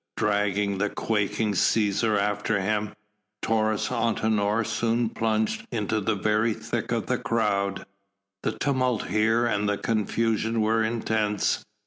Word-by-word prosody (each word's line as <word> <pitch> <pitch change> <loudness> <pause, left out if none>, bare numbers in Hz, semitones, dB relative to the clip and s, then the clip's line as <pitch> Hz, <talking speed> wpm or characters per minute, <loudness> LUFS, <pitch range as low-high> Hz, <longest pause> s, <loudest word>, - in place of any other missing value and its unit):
Dragging 100 -1 0
the 105 +1 +1
quaking 105 0 -1
Cæsar 105 +1 +2
after 105 +1 0
him, 105 +2 -1 0.5
Taurus 110 -1 +1
Antinor 110 -2 +1
soon 115 +1 0
plunged 110 -1 -1
into 110 -1 -1
the 110 +2 0
very 110 +2 +1
thick - - -4
of - - 0
the - - -1
crowd. 100 -3 0 0.6
The - - -1
tumult 130 -5 0
here 110 +2 +2
and 105 -3 0
the 105 - 0
confusion 115 +1 0
were 110 +1 +2
intense. 110 -2 0
110 Hz, 125 wpm, -26 LUFS, 105-115 Hz, 0.6 s, Cæsar